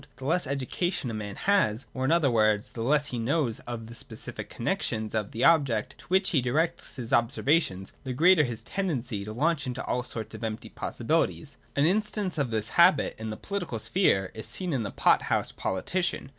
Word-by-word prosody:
The 130 - -9
less 165 +1 +1
education 140 +1 -2
a - - -6
man 105 -2 -5
has, 170 - +2
or, 130 0 -2
in 135 - +2
other 160 -6 +4
words, 110 -2 +2
the 115 - -7
less 145 +4 +2
he 120 - -1
knows 125 -1 0
of 120 -2 -5
the 115 - -10
specific - - -5
connexions 110 -1 -2
of 110 -3 -1
the 115 - -3
objects 135 -7 +3
to - - -15
which 190 +2 +3
he 145 -7 +3
directs 150 +7 -1
his 120 -5 -4
observa 135 +7 +3
tions, 95 - -5
the 130 - -4
greater 165 +6 +5
is 150 - +1
his 115 -2 -3
tendency 130 - -2
to 105 - -6
launch 150 +5 +1
out - - -6
into 125 0 -4
all 125 - 0
sorts 110 -3 -6
of - - -8
empty 110 -1 -4
possibilities. - - -1 0.2
An 140 - +3
instance 200 -1 0
of 140 -4 +1
this 110 -1 -1
habit - - +4
in 110 0 -4
the 110 - -5
political 195 - -4
sphere 105 - +1
is 110 - -7
seen 180 -4 -4
in 130 - 0
the 105 - -3
pot - - +3
house - - 0
politician. 175 - -2
130 Hz, 210 wpm, -28 LUFS, 110-165 Hz, 0.2 s, greater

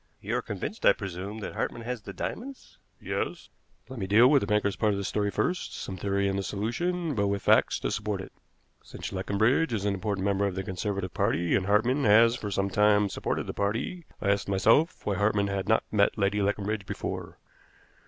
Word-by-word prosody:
"You - - -3
are - - -1
convinced, - - -6
I - - +7
presume, 100 +3 -6
that - - -5
Hartmann 120 - -3
has 125 -1 -4
the 100 - -8
diamonds?" 260 - -7 0.2
"Yes." - - -4 0.4
"Let 130 -2 -8
me 95 - -3
deal 110 +5 +6
with 140 0 +5
the - - -2
banker's 105 -2 +1
part 105 -2 +1
in - - -2
the 100 - -3
story 105 +1 -1
first 180 - -2
some 95 - -5
theory 100 +1 0
in 95 0 -1
the - - 0
solution, 155 - -2
but 100 -4 +1
with 100 0 -2
facts - - +4
to - - -1
support 105 -2 -2
it. 95 - -8 0.5
Since - - -8
Leconbridge 110 +11 +1
is 100 -2 -1
an 100 - +1
important 100 0 -2
member 100 0 +1
of 95 - -4
the 95 - -3
Conservative 95 -1 -3
Party, 85 +3 +1
and 95 - +1
Hartmann 120 +7 +2
has 115 +3 +6
for 105 -4 -5
some 100 0 -1
time 105 0 +4
supported - - -2
the - - -5
party, 115 - -2
I 100 - +1
asked 100 0 -1
myself 115 - +3
why 100 -2 0
Hartmann 100 0 +1
had 100 0 -3
not 110 - +3
met 100 -2 +2
Lady 100 0 +1
Leconbridge 100 0 -1
before. - - -5
100 Hz, 210 wpm, -28 LUFS, 100-110 Hz, 0.5 s, I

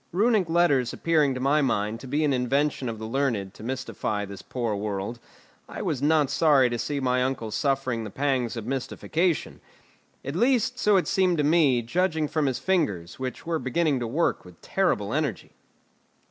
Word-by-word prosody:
Runic 205 -1 +2
letters 165 -8 +2
appearing 155 -5 +2
to - - -4
my 140 +4 +2
mind 110 -4 0
to 135 - -10
be 145 +4 0
an 145 -2 +2
invention 135 +1 0
of 115 - -5
the 110 - -6
learned 115 -6 -1
to - - -14
mystify 115 -4 -3
this 100 -1 -9
poor 120 -4 -3
world, 100 +2 -4 0.5
I - - -6
was 140 -4 -2
not 150 -1 +3
sorry 140 -6 +4
to 120 - -2
see 145 +3 -2
my 125 -1 +1
uncle 125 -4 -2
suffering 130 0 0
the 110 - -6
pangs 130 -1 -1
of 110 - -5
mystification. 155 +6 -2 0.6
At 140 +3 -4
least, 250 +3 +2
so 210 -4 +4
it 185 - 0
seemed 185 -3 +2
to 150 - +1
me, 145 -6 +3
judging 160 +4 0
from 150 -1 0
his 130 - 0
fingers, 105 - -1
which 130 +3 -5
were 165 -1 -1
beginning 135 +2 0
to 120 - -3
work 155 +9 0
with 90 -2 -15
terrible - - 0
energy. - - -2
135 Hz, 185 wpm, -26 LUFS, 120-160 Hz, 0.6 s, sorry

